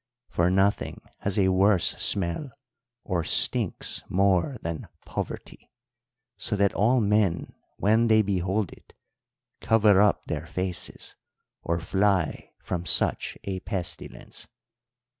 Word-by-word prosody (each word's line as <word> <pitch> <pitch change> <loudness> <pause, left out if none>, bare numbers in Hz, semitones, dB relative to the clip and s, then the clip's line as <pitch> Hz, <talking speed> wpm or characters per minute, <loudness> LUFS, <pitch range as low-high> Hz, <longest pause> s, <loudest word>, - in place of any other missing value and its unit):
For 85 +1 +1
nothing 95 +2 0 0.2
has 100 +1 -3
a 95 -2 +3
worse 95 0 +3
smell, 95 - +1 0.5
or 90 -4 -2
stinks - - +3
more, 95 - +1
than 85 -2 -5 0.2
poverty, - - -7 0.7
so 105 - -2
that 100 -1 +2
all 120 +5 +2
men 105 -5 +1 0.2
when 110 +3 +2
they 110 -1 +4
behold 95 0 -1
it - - -20 0.6
cover 105 -3 +4
up 105 -2 +2
their - - -5
faces 90 -1 -5 0.5
or 85 +1 -2
fly 95 0 0
from 90 -2 -3
such - - 0
a 95 -1 -4
pestilence.' 90 -2 -6
95 Hz, 115 wpm, -26 LUFS, 90-105 Hz, 0.7 s, they